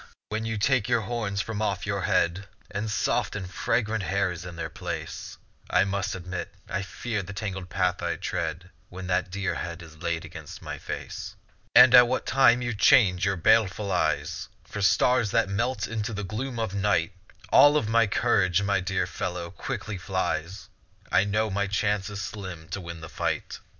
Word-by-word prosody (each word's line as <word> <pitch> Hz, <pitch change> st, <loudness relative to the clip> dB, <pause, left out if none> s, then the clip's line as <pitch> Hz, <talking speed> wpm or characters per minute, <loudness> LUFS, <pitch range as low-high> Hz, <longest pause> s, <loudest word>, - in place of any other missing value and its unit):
when 110 Hz, +1 st, -2 dB
you 110 Hz, -1 st, -2 dB
take 120 Hz, +1 st, +2 dB
your 120 Hz, -2 st, +3 dB
horns 105 Hz, -3 st, -2 dB
from 110 Hz, -1 st, -4 dB
off 100 Hz, -3 st, -1 dB
your 100 Hz, 0 st, -1 dB
head, 90 Hz, +2 st, +1 dB, 0.2 s
And 105 Hz, +2 st, -3 dB
soft 105 Hz, -, 0 dB
and 100 Hz, -3 st, -4 dB
fragrant 110 Hz, +3 st, 0 dB
hair 100 Hz, 0 st, 0 dB
is 90 Hz, +1 st, -7 dB
in 85 Hz, -, -8 dB
their 85 Hz, -, -4 dB
place; -, -, -6 dB, 0.3 s
I -, -, +4 dB
must 100 Hz, 0 st, -2 dB
admit 90 Hz, 0 st, -5 dB, 0.2 s
I 95 Hz, -, -2 dB
fear 105 Hz, +2 st, -3 dB
the 100 Hz, +2 st, -8 dB
tangled 95 Hz, -3 st, -5 dB
path 90 Hz, +2 st, 0 dB
I 85 Hz, 0 st, -1 dB
tread 85 Hz, +1 st, -4 dB, 0.2 s
When 95 Hz, +1 st, -8 dB
that 90 Hz, 0 st, 0 dB
dear 100 Hz, +1 st, -2 dB
head 85 Hz, 0 st, -5 dB
is 80 Hz, -1 st, -13 dB
laid 85 Hz, -2 st, -2 dB
against -, -, -9 dB
my -, -, -6 dB
face. -, -, -6 dB, 0.4 s
And 130 Hz, -, +9 dB
at 125 Hz, -1 st, +9 dB
what 130 Hz, -, -1 dB
time 125 Hz, -1 st, +4 dB
you 120 Hz, 0 st, -1 dB
change 105 Hz, -5 st, +5 dB
your 100 Hz, 0 st, +1 dB
baleful 105 Hz, +1 st, +3 dB
eyes 85 Hz, -4 st, -1 dB
For 105 Hz, -, -6 dB
stars 120 Hz, +3 st, +3 dB
that 115 Hz, -2 st, +2 dB
melt 110 Hz, +7 st, -1 dB
into 110 Hz, 0 st, -3 dB
the 105 Hz, 0 st, -4 dB
gloom 120 Hz, +6 st, -4 dB
of 110 Hz, -4 st, -2 dB
night, 100 Hz, -4 st, +1 dB, 0.4 s
All 145 Hz, +1 st, +7 dB
of 130 Hz, -, 0 dB
my 115 Hz, 0 st, +4 dB
courage, 100 Hz, -4 st, +2 dB
my 100 Hz, -1 st, +2 dB
dear 95 Hz, +1 st, -1 dB
fellow, 85 Hz, -1 st, -4 dB
quickly 105 Hz, -2 st, -5 dB
flies; 95 Hz, 0 st, -2 dB, 0.4 s
I 95 Hz, -, +4 dB
know 110 Hz, +1 st, 0 dB
my 100 Hz, +1 st, 0 dB
chance 105 Hz, 0 st, 0 dB
is 105 Hz, -1 st, -6 dB
slim 95 Hz, -6 st, -7 dB
to 100 Hz, -, -4 dB
win 85 Hz, -1 st, -8 dB
the 80 Hz, -, -7 dB
fight. -, -, -3 dB
100 Hz, 185 wpm, -27 LUFS, 90-110 Hz, 0.4 s, And